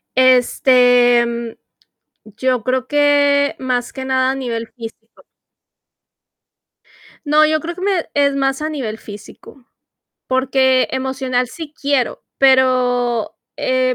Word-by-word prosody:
Este, 245 -1 +4
mm, 235 -1 -5 0.8
yo 255 -3 0
creo 255 0 -1
que, 285 -1 +2
más 250 -2 -3
que 265 0 -6
nada 260 0 +1
a 270 - -4
nivel 230 -3 -4
físico. 225 -1 -12 2.0
No, 300 +1 +4
yo 310 0 +1
creo 340 +3 -6
que 365 - -10
me 380 -3 -1
es 280 -1 +1
más 270 +1 -1
a 310 - -2
nivel 250 -8 -5
físico, 215 +5 -13 0.6
porque 260 0 +1
emocional 260 -1 -2
sí 315 0 -9
quiero, 280 -3 -1 0.2
pero, 250 -3 +2 0.2
eh, 255 0 0
260 Hz, 115 wpm, -17 LUFS, 245-280 Hz, 2.0 s, Este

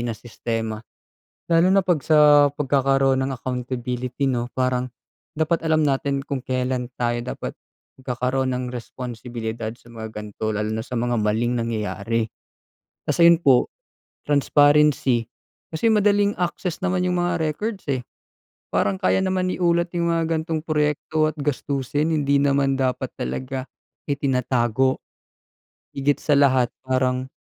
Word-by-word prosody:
na 120 -2 -3
sistema. 115 -1 -4 0.7
Lalo 170 +2 +4
na 195 - +5
'pag 175 -6 +1
sa 150 -1 +6
pagkakaroon 135 -1 +2
ng 135 - -2
accountability 125 +1 -3
'no, 120 -2 -1
parang 130 0 -1 0.5
dapat 160 +1 +1
alam 155 -2 +2
natin 140 0 0
kung 135 -2 -3
kelan 125 -1 -2
tayo 120 -1 0
dapat 125 - -5 0.5
magkakaroon 130 +1 -1
ng 125 0 -2
responsibilidad 115 -2 -5
sa - - -25
mga 110 -1 -6
ganito, 105 0 -5
lalo 105 0 -2
na 110 - -2
sa 125 -1 -4
mga 120 +1 0
maling 115 +3 +1
nangyayari. 115 0 -1 0.8
Tas - - -2
ayun 170 0 +8
po, 130 -3 +5 0.6
transparency 145 -4 +3 0.4
kasi 195 +8 +1
madaling 205 -1 +3
access 180 0 -2
naman 185 -1 0
yung 180 -1 +1
mga 175 0 0 0.2
records, 210 +4 -5
eh. 130 - -1 0.7
Parang 190 0 0
kaya 190 - +3
naman 185 -1 0
iulat 170 -1 +1
yung 170 0 +1
mga 165 -1 0
gan'tong 160 -1 -1
proyekto 155 0 0
at - - -38
gastusin, 145 +2 -1
hindi 140 -2 +2
naman 140 -1 +2
dapat 130 -1 -1
talaga 130 - -4 0.4
itinatago, 130 -2 0 1.0
higit 140 +1 +1
sa 145 -2 +3
lahat 130 -3 +4 0.2
parang 130 0 0
135 Hz, 135 wpm, -23 LUFS, 125-155 Hz, 1.0 s, ayun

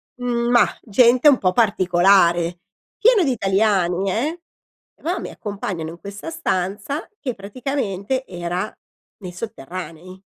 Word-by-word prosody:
mhmm, 240 -1 -1
mah, 240 -1 +3
gente 245 +6 +4
un 270 - +5
po' 185 -1 +1
particolare, 175 -4 +3 0.4
pieno 450 -3 +5
di 275 - +1
italiani, 195 -3 +1
eh. 305 - -2 0.6
Va 350 +4 -1
mi - - -6
accompagnano 195 -6 -5
in 170 +1 -10
questa 200 +9 -8
stanza, 210 - -2
che 255 -4 -3
praticamente 230 +2 -3
era 175 +3 -3 0.5
nei 180 -2 -7
sotterranei. 185 -1 -8
200 Hz, 120 wpm, -21 LUFS, 180-245 Hz, 0.6 s, un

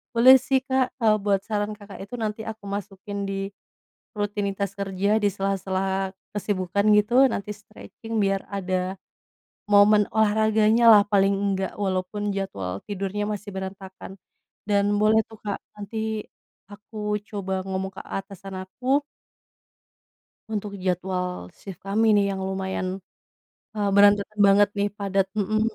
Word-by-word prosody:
Boleh 255 +3 +9
sih 265 -1 +4
Kak, 260 -1 +2
kalau 215 -2 +4
buat 200 -1 +2
saran 210 -1 -1
Kakak 205 -1 -11
itu 245 - -7
nanti 215 0 -3
aku 220 -1 -14
masukin 200 0 -7
di, 195 - -2 0.8
rutinitas 200 -2 -2
kerja 195 0 -1
di - - +5
sela-sela 195 0 -1 0.2
kesibukan 200 -1 -1 0.2
gitu, 210 +3 -2 0.2
nanti 210 0 -4
stretching 220 +1 -11
biar 195 0 0
ada, 185 -1 -2 0.7
momen 205 +1 +6
olahraganya 220 +1 +3
lah 210 -2 +9
paling 200 -1 +3
enggak, 195 -1 -1
walaupun 195 +1 -2
jadwal 100 - -4
tidurnya 200 0 -3
masih 205 0 -4
berantakan. 190 0 -8 0.5
Dan 200 -1 +2
boleh 215 +1 +4
tuh 220 -1 -14
Kak, 205 -1 -3 0.2
nanti, 220 +1 -4 0.4
aku 210 +2 -12 0.3
coba 195 -2 -4
ngomong 190 0 -3
ke - - -8
atasan 195 0 -7
aku 255 +9 0 1.5
untuk 210 -1 -3
jadwal 180 0 -1 0.3
shift 190 -2 -9
kami 215 +3 +2
nih 200 - +4
yang 190 - -4
lumayan, 190 -1 -3 0.9
eee, 205 -1 0
berantakan 205 +1 +4
banget 200 +1 +5
nih 200 0 +1
padat, 195 -1 +1
mhm. 215 +2 +1
200 Hz, 130 wpm, -25 LUFS, 190-210 Hz, 1.5 s, Boleh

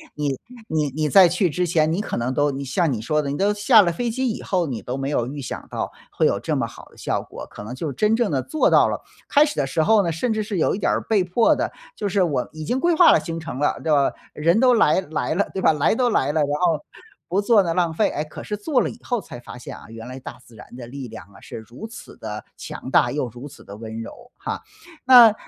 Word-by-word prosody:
你 145 -3 -1 0.3
你 155 -2 0
你 150 +3 -1
在 180 +4 +7
去 180 +1 +1
之 180 +4 -1
前， 160 -2 +2
你 195 - 0
可 - - -4
能 120 +2 -1
都 145 +1 +2
你 140 0 -5
像 150 +4 +1
你 115 -4 -2
说 150 +6 +1
的， 140 - -4
你 140 - -2
都 200 +2 +2
下 210 +2 +6
了 170 -3 +1
飞 240 +6 -2
机 260 +3 -1
以 220 - -4
后， 180 -4 0
你 120 -6 -4
都 125 +2 -4
没 135 0 -2
有 120 -5 0
预 145 +2 -6
想 125 - -6
到 - - -3 0.2
会 - - +1
有 - - +2
这 - - -2
么 - - -1
好 - - -13
的 - - -21
效 - - -2
果。 - - -10
可 - - -10
能 110 +4 -7
就 140 +1 -4
真 210 - +2
正 235 -2 +1
地 135 - +1
做 310 - +1
到 - - +5
了 - - -3 0.3
开 290 +1 +6
始 300 - -4
的 140 - 0
时 135 +4 0
候 210 +5 +4
呢， 170 - 0
甚 220 +9 -1
至 215 -1 -1
是 205 -2 -4
有 165 - +2
一 - - -5
点 - - +1
儿 - - 0
被 210 -4 +2
迫 180 +6 +3
的， - - -2 0.2
就 205 - -2
是 195 0 +2
我 145 -7 -1
已 155 0 -7
经 245 - 0
规 345 +4 +2
划 335 +1 +7
了 - - +4
行 165 -1 -5
程 160 -5 -6
了， 145 - +1
对 160 - -1
不？ - - +5 0.4
人 165 +7 +2
都 250 0 +5
来 190 -7 +4
来 155 -2 -2
了， 200 +5 +1
对 190 - -3
吧？ - - +5
来 150 +6 +2
都 245 +1 +2
来 145 - +1
了， 155 - +1
然 145 - +2
后 165 -4 +2 0.4
不 190 +4 +1
做 210 0 +5
呢 170 -2 -1
浪 170 -2 +1
费。 210 - +2
哎， 150 - -3
可 155 - -10
是 210 - -3
做 255 +6 +1
了 - - -1
以 230 - -11
后 245 -2 -1
才 120 - -10
发 120 - -10
现 125 - -8
啊， - - -13
原 115 +1 -9
来 130 +1 -7
大 125 -1 -9
自 115 - -18
然 110 - -13
的 120 -2 -8
力 135 0 -7
量 110 -1 -10
啊， 100 - -15
是 - - -9
如 115 - -9
此 230 - -12
的 105 -1 -6
强 - - -7
大 120 - +4
又 145 -2 -1
如 120 +5 -9
此 145 - -14
的 100 - -10
温 110 0 -7
柔 115 - -11
哈。 - - -5 0.4
那， 245 -4 +9
160 Hz, 305 characters per minute, -22 LUFS, 135-205 Hz, 0.4 s, 那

